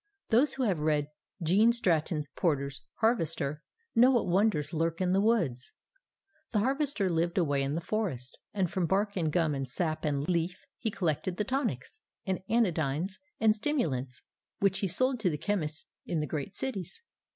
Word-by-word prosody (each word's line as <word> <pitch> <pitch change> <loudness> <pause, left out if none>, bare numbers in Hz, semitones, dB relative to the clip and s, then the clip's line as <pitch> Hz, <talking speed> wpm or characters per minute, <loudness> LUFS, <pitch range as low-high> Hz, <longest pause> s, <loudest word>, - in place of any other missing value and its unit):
Those 255 +5 +3
who 265 - -1
have 195 -9 +1
read 150 -1 +1 0.3
Gene 200 +8 +5
Stratton 165 -9 +1
Porter's 140 -5 0 0.2
Harvester 155 - +1 0.3
know 245 +3 +6
what 245 -3 +3
wonders 185 -4 +1
lurk 165 +1 0
in 185 -1 +1
the 195 - +4
woods. 175 - +1 0.8
The - - +2
Harvester 270 -4 +1
lived 170 0 0
away 145 -6 +2
in 135 +1 -1
the 165 - -1
forest, 165 - -3
and 190 -5 0
from 185 -4 0
bark 200 +4 +1
and 165 -5 0
gum 160 -2 +2
and 135 -2 -3
sap 155 +3 -2
and 145 -1 0
leaf 175 +1 -1
he 225 - -1
collected 175 -2 -1
the - - +1
tonics 235 - -2 0.3
and 190 -1 -1
anodynes 175 -5 +1 0.2
and 215 -1 +4
stimulants 155 - -1 0.4
that 195 -1 +3
he 195 - 0
sold 255 +8 +2
to 200 -5 +2
the 150 - -2
chemists 160 -3 -2 0.2
in 170 - 0
the 150 - 0
great 155 +5 -4
cities. 265 - -4
175 Hz, 170 wpm, -30 LUFS, 150-215 Hz, 0.8 s, know